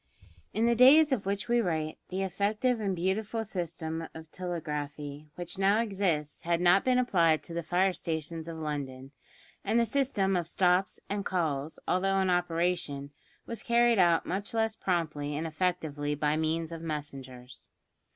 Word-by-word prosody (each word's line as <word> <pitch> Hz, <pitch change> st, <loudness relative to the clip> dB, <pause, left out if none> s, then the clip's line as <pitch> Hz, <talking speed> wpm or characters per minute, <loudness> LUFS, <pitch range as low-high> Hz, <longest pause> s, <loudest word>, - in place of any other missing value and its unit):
In 220 Hz, +3 st, +1 dB
the 235 Hz, -, +4 dB
days 275 Hz, +6 st, +7 dB
of 220 Hz, -7 st, 0 dB
which 200 Hz, +2 st, -1 dB
we 240 Hz, 0 st, +3 dB
write 160 Hz, -5 st, -2 dB
the 190 Hz, +1 st, -2 dB
effective 210 Hz, +6 st, 0 dB
and 200 Hz, -3 st, -1 dB
beautiful 210 Hz, +5 st, -1 dB
system 165 Hz, -4 st, -4 dB
of 160 Hz, 0 st, -10 dB
telegraphy 150 Hz, -4 st, -5 dB
which 175 Hz, +2 st, -6 dB
now 200 Hz, +2 st, +4 dB
exists 190 Hz, -9 st, -1 dB
had 170 Hz, 0 st, 0 dB
not 180 Hz, +2 st, +5 dB
been 255 Hz, -1 st, +3 dB
applied 170 Hz, -10 st, +3 dB
to 170 Hz, -, -9 dB
the 170 Hz, -, -2 dB
fire 180 Hz, +3 st, +2 dB
stations 160 Hz, -1 st, -4 dB
of 165 Hz, -1 st, -6 dB
London, 140 Hz, -4 st, -5 dB, 0.5 s
and 230 Hz, -, +2 dB
the 235 Hz, -, +3 dB
system 225 Hz, -8 st, +1 dB
of 175 Hz, -3 st, -1 dB
"stops" 180 Hz, +2 st, +2 dB
and 200 Hz, 0 st, -2 dB
"calls," 160 Hz, -6 st, -1 dB
although 195 Hz, +1 st, +2 dB
in 190 Hz, -1 st, +2 dB
operation, 170 Hz, -5 st, -1 dB, 0.3 s
was 230 Hz, -2 st, -5 dB
carried 235 Hz, -2 st, +3 dB
out 170 Hz, -2 st, +4 dB
much 200 Hz, +5 st, -3 dB
less 225 Hz, -1 st, +1 dB
promptly 155 Hz, -7 st, -1 dB
and 160 Hz, -, -2 dB
effectively 155 Hz, -3 st, -1 dB
by 150 Hz, +1 st, +1 dB
means 160 Hz, +1 st, -1 dB
of 165 Hz, -1 st, -6 dB
messengers. 135 Hz, -5 st, -7 dB
175 Hz, 160 wpm, -29 LUFS, 155-200 Hz, 0.5 s, days